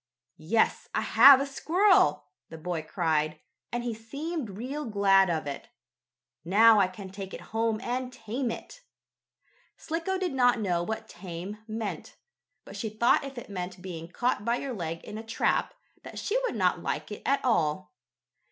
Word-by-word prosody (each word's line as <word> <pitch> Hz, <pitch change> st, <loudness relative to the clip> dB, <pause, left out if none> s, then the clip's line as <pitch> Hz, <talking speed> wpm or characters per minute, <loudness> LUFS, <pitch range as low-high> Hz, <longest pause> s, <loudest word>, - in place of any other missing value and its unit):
"Yes, 220 Hz, +8 st, +1 dB
I -, -, +2 dB
have 265 Hz, +4 st, +8 dB
a 275 Hz, -, 0 dB
squirrel!" 280 Hz, -, +3 dB, 0.2 s
the 160 Hz, -, -9 dB
boy 165 Hz, 0 st, -3 dB
cried, 155 Hz, -2 st, -1 dB, 0.3 s
and 240 Hz, 0 st, -2 dB
he 240 Hz, -1 st, -2 dB
seemed 280 Hz, +5 st, -5 dB
real 270 Hz, +6 st, -4 dB
glad 195 Hz, -3 st, +4 dB
of 160 Hz, -3 st, -1 dB
it. 140 Hz, -1 st, -6 dB, 0.7 s
"Now 215 Hz, +5 st, +6 dB
I 190 Hz, -, +4 dB
can 190 Hz, +1 st, -10 dB
take 195 Hz, -1 st, -7 dB
it -, -, -9 dB
home 225 Hz, -1 st, +1 dB
and 250 Hz, +1 st, -3 dB
tame 240 Hz, +2 st, -3 dB
it." -, -, -8 dB, 1.0 s
Slicko 335 Hz, +4 st, -2 dB
did 370 Hz, -5 st, -2 dB
not 245 Hz, -2 st, +3 dB
know 180 Hz, -5 st, 0 dB
what 220 Hz, +5 st, -4 dB
"tame" 180 Hz, +3 st, -7 dB
meant, 220 Hz, -1 st, -5 dB, 0.5 s
but -, -, -10 dB
she 220 Hz, -, -3 dB
thought 235 Hz, +6 st, +3 dB
if 275 Hz, -1 st, -8 dB
it 240 Hz, -, -7 dB
meant 180 Hz, -2 st, -6 dB
being 170 Hz, -3 st, -7 dB
caught 225 Hz, +4 st, -1 dB
by 235 Hz, +2 st, +1 dB
your 265 Hz, +1 st, -4 dB
leg 165 Hz, -5 st, -5 dB
in 215 Hz, -, -7 dB
a -, -, -7 dB
trap, 225 Hz, 0 st, 0 dB, 0.3 s
that -, -, -10 dB
she 425 Hz, -, -2 dB
would -, -, -2 dB
not -, -, +1 dB
like -, -, -3 dB
it -, -, -6 dB
at 275 Hz, -1 st, +1 dB
all. 165 Hz, -7 st, +1 dB
220 Hz, 170 wpm, -28 LUFS, 180-250 Hz, 1.0 s, have